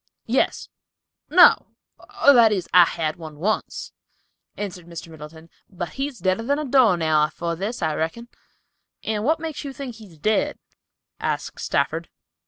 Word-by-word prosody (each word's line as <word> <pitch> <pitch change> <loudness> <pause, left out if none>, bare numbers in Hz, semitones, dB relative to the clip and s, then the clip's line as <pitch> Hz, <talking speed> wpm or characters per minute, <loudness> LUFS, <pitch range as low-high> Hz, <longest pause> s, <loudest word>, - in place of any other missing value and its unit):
"Yes—no, 355 +3 +1 0.5
or, 285 - +9
that 230 -4 +6
is, 190 -4 -1
I 180 -1 +8
had 160 -1 -3
one 155 -3 -10
once," 205 +8 -2 0.6
answered 180 -4 -6
Mr. 170 -1 -9
Middleton, 160 +1 -12 0.2
"but 175 -3 -5
he's 270 - -4
deader 185 +2 0
than 280 +5 0
a 305 - -3
door 250 -8 +4
nail 155 -2 +3
afore 170 +2 -4
this, 200 +4 -4
I 160 -1 +1
reckon." 165 +11 -3 0.8
"And 215 -1 -2
what 315 +6 +2
makes 315 -1 -5
you 280 - -5
think 260 -4 -7
he 220 -2 -13
is 165 -4 -18
dead?" 215 +8 0 0.6
asked - - -3
Stafford. - - -1
190 Hz, 155 wpm, -23 LUFS, 165-245 Hz, 0.8 s, or